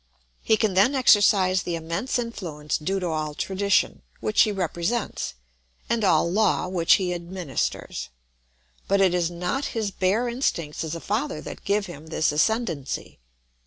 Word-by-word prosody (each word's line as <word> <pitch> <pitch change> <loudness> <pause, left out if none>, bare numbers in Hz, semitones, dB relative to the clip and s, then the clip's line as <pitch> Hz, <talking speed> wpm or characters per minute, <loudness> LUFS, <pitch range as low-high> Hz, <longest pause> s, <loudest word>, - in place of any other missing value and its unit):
He 220 - +3
can 215 -3 +1
then 200 +9 +4
exercise 200 -6 +5
the 175 -3 -3
immense 170 +11 -2
influence 170 -11 -3
due 190 +6 -1
to 180 -2 -2
all 155 -2 -2
tradition, 195 - +1 0.2
which 110 -1 +2
he 215 - +4
represents, 185 - -2 0.6
and 230 -2 +1
all 165 -4 +4
law, 195 0 +2
which 175 -3 +3
he 180 -2 +2
administers; 175 - -4 0.8
but 200 0 +2
it 190 -2 +4
is 175 -2 +1
not 180 +11 -2
his 215 -3 -1
bare 195 +6 +1
instincts 175 - -2
as 160 0 -4
a 165 - -6
father 245 +8 -2
that - - -9
give 200 0 +1
him 160 -3 -10
this 160 -1 +1
ascendency. 165 - -1
185 Hz, 155 wpm, -25 LUFS, 165-210 Hz, 0.8 s, exercise